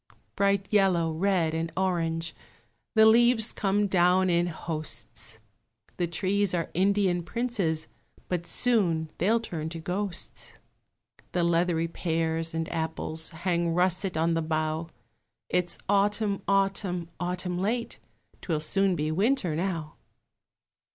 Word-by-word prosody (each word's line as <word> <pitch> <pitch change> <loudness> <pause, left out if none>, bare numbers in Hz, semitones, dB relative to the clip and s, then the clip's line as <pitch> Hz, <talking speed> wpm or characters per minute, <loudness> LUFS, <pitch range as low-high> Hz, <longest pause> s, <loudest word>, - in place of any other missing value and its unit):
Bright 200 -1 +2
yellow, 185 -5 +3
red, 170 -1 +1
and 165 0 -2
orange, 165 -3 0 0.6
The 220 0 +7
leaves 230 0 +5
come 205 0 +1
down 185 -1 +3
in 170 0 +2
hosts; 120 -10 -5 0.6
The 175 - 0
trees 190 +3 0
are 165 -2 -2
Indian 190 -1 +2
princes, 190 -7 -1 0.4
But 175 -1 -2
soon 170 -8 +2
they'll 220 +7 +3
turn 160 -8 -5
to 165 0 -6
ghosts; 185 +2 -4 0.8
The 175 - +1
leathery 170 -1 +2
pears 165 -1 -1
and 165 0 -1
apples 160 0 -2
Hang 170 0 -1
russet 180 0 +1
on 165 +1 +2
the 165 - +1
bough; 155 +1 -2 0.6
It's 180 -1 0
Autumn, 205 0 +1
Autumn, 195 -3 0
Autumn 180 0 -2
late, 230 +5 -2 0.4
'Twill 160 -4 -1
soon 195 +4 +2
be 155 -1 -1
Winter 195 - +1
now. 165 -3 -3
175 Hz, 120 wpm, -27 LUFS, 165-195 Hz, 0.8 s, The